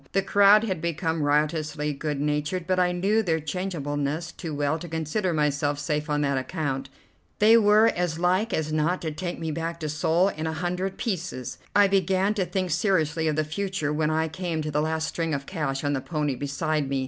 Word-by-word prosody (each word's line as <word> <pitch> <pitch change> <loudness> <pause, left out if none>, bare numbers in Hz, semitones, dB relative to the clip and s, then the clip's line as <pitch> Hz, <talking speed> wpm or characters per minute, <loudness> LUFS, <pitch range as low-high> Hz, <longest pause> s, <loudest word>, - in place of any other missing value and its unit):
The 195 - +2
crowd 205 +2 +6
had 190 -7 -2
become 165 -1 -1
riotously 150 0 0
good 145 0 -3
natured, 150 +4 -1
but 185 +1 +1
I 180 -1 +3
knew 195 +5 +2
their 165 -6 0
changeableness 155 -2 -3
too 165 -2 -7
well 145 +2 0
to 175 - -7
consider 160 +4 -1
myself 145 -2 0
safe 150 +1 -2
on 150 0 +1
that 140 -2 +1
account. 135 -2 -3 0.5
They 220 +2 +6
were 215 -1 +6
as 175 -2 -1
like 185 +6 +1
as 155 -3 -1
not 155 +4 +1
to 160 - -2
take 175 +3 -4
me 160 -1 -3
back 165 +2 -4
to 155 - -2
Seoul 165 +5 +2
in 160 -3 -4
a 160 - -2
hundred 180 +3 -2
pieces. 180 - -4 0.2
I 205 -1 +6
began 195 +1 +2
to 195 -4 -1
think 185 0 -2
seriously 160 -3 +1
of 155 - +1
the 155 - +1
future 160 -1 -2
when 155 0 +1
I 160 +1 +1
came 165 -1 -3
to 155 - -3
the 150 +1 +1
last 160 +1 -1
string 165 -2 -1
of 140 0 -5
cash 150 -6 -3
on 145 0 0
the 135 - -1
pony 150 -2 -1
beside 140 +2 -2
me. 135 -1 0
160 Hz, 205 wpm, -26 LUFS, 150-185 Hz, 0.5 s, crowd